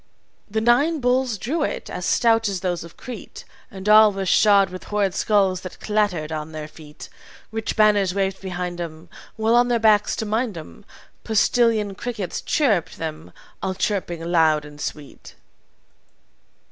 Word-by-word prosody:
"The 220 +1 -1
nine 280 +8 +3
bulls 250 -2 +1
drew 290 - -2
it, - - -3
as 180 -1 -5
stout 225 -2 +3
as 190 -3 -4
those 175 -2 -2
of 170 - -14
Crete, 245 -4 -9 0.3
And 190 +1 -9
all 215 0 +7
were 195 -1 -4
shod 200 -1 +4
with 185 - -9
horrid 205 -3 0
skulls 195 -3 +1
that 185 - -9
clattered 205 -8 -1
on 155 0 -5
their 155 -1 -6
feet. 155 -1 -13 0.4
Rich 225 -1 -3
banners 205 -4 +3
waved 195 -1 -1
behind 180 -2 -4
'em 165 0 -8 0.3
While 220 +1 +1
on 240 +1 +4
their 240 -1 +2
backs, 215 -2 +3
to 220 - -3
mind 220 -2 -1
'em, 85 - -11 0.4
Postilion 220 -1 +2
crickets 210 -3 -5
chirruped 220 - 0
them, 160 0 -6 0.3
all 190 -1 -2
chirping 185 -4 -2
loud 160 -3 +2
and 150 0 -12
sweet. 145 -2 -8
200 Hz, 160 wpm, -22 LUFS, 175-220 Hz, 0.4 s, all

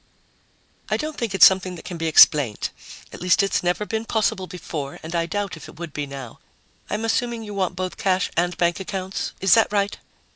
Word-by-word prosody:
"I - - +1
don't 310 0 -4
think 225 -7 -3
it's - - +9
something 185 -1 +3
that 170 - -12
can 175 - -6
be 165 0 -2
explained. 145 -7 +5 0.4
At - - -10
least 180 +3 +3
it's 195 - 0
never 180 +4 0
been 220 +1 -3
possible 215 -4 0
before 160 -6 -6
and 160 +2 -7
I 170 0 0
doubt 200 +2 -3
if - - -11
it - - -15
would 170 -3 -7
be 145 -1 -3
now. 135 -4 -9 0.5
I'm 215 +2 -2
assuming 235 0 -1
you 210 -1 -7
want 185 -2 -1
both 185 0 -4
cash 185 -1 0
and 175 +1 0
bank 175 +2 +1
accounts. 190 -1 -4
Is 190 -1 +5
that 225 -2 +4
right?" 205 -1 0
185 Hz, 210 wpm, -23 LUFS, 170-205 Hz, 0.5 s, it's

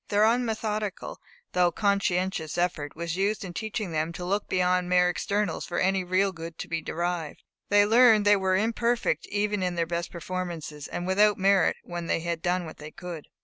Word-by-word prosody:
Their 205 +1 +3
unmethodical 220 -3 -1 0.3
though 180 -1 +3
conscientious 190 -4 0
effort 170 -5 -1
was 170 +1 -3
useful 200 +2 0
in - - -8
teaching 215 -2 -4
them 160 +1 -1
to 175 - -6
look 200 +3 -1
beyond 180 -1 +1
mere 180 0 +4
externals 200 -1 -2
for 175 - -4
any 190 0 +2
real 185 +2 +1
good 165 -2 -8
to - - -6
be 165 -1 -2
derived. 170 -1 -3 0.3
They 205 0 +5
learned 225 -1 +6
they 205 0 +6
were 190 -1 +1
imperfect 230 -4 0
even 205 0 -1
in 180 -1 -1
their 170 -1 0
best 170 +1 -3
performances, 170 -4 -5
and 175 - -4
without 205 +3 +3
merit 195 -2 +3
when 175 -1 -6
they 165 - 0
had 170 -1 -3
done 180 0 0
what 160 - -9
they 150 0 -9
could. 170 -2 -8
180 Hz, 190 wpm, -27 LUFS, 170-205 Hz, 0.3 s, learned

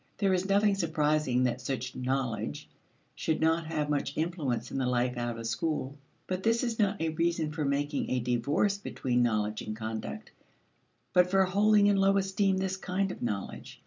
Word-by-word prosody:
There 195 -2 +2
is 185 +1 0
nothing 200 +1 +4
surprising 155 -7 +1
that 125 0 0
such 130 -1 -4
"knowledge" 130 -2 -2 0.5
should 160 - -1
not 160 0 +2
have 150 -2 -1
much 140 -1 -1
influence 150 -8 -2
in - - -2
the 130 - 0
life 125 0 +1
out 120 -1 -3
of 115 - -6
school. 140 +3 -2 0.3
But 185 0 -3
this 230 +3 +2
is 235 -2 -2
not 205 -1 +2
a 165 - 0
reason 165 -1 0
for 155 0 -3
making 145 +1 -1
a 130 - +1
divorce 135 - +1
between 125 -10 -1
knowledge 105 -3 0
and 110 - -5
conduct, 110 -10 -5 0.8
but 180 0 +5
for 195 +1 +4
holding 205 +2 +4
in 205 -1 +4
low 195 0 +4
esteem 195 0 +1
this 190 0 -1
kind 190 +1 -1
of - - -9
knowledge. 100 -4 -4
155 Hz, 180 wpm, -29 LUFS, 125-190 Hz, 0.8 s, but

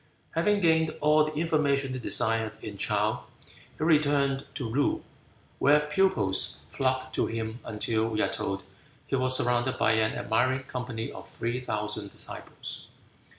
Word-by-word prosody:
Having 205 +5 +2
gained 160 -2 +3
all 150 +1 +4
the 155 - -4
information 145 -5 +1
he 130 - -4
desired 110 -2 +2
in 105 -2 -6
Chow, 105 +3 0 0.5
he - - -3
returned 145 -4 +2
to 130 -6 -3
Loo, 135 +6 0 0.6
where 145 +2 +5
pupils 150 - +2
flocked 130 -1 -1
to - - +1
him 115 +1 -4
until, 110 +1 -1
we 110 -1 -2
are - - +2
told, 95 0 -3 0.4
he - - -1
was 130 0 +4
surrounded 125 +2 +1
by - - +3
an 110 0 +2
admiring 130 +4 +1
company 125 -3 -5
of - - -10
three 120 +2 -3
thousand 105 -4 -4
disciples. - - -6
130 Hz, 150 wpm, -28 LUFS, 110-145 Hz, 0.6 s, where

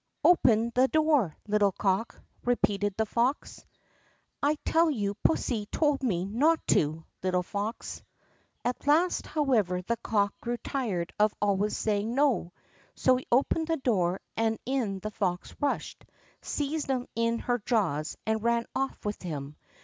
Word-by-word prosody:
"Open 235 -9 +4
the 255 +1 +4
door, 300 - +2
little 205 -2 +3
cock!" 195 +4 -1 0.2
repeated 205 -5 +1
the 220 - +2
fox. 240 +6 -1 0.8
"I 295 +2 +2
tell 330 0 +4
you 205 -8 -1
pussy 225 -9 +1
told 295 +2 +1
me 185 -9 0
not 290 +11 +2
to, 155 +1 +2 0.2
little 180 -1 +1
fox!" 205 +5 -4 0.6
At 250 +3 -2
last, 330 +5 +3
however, 225 - +1
the 235 +5 -1
cock 205 -3 0
grew 240 0 -2
tired 210 -11 -3
of 210 0 +3
always 205 0 +1
saying 215 +2 -1
"No!" 265 -11 +2 0.4
so 255 - +4
he 255 - -8
opened 285 +6 +2
the 325 -1 +1
door, 190 -8 +1
and 225 0 +1
in 240 -7 -1
the 215 - -4
fox 180 -4 -2
rushed, 290 -1 -2 0.4
seized 295 +1 -2
him 255 -2 0
in 230 +1 +1
her 245 +1 -1
jaws, 170 - 0
and 220 0 0
ran 235 +1 +1
off 270 -4 -2
with 210 0 -3
him. 150 -4 -5
225 Hz, 150 wpm, -28 LUFS, 200-265 Hz, 0.8 s, Open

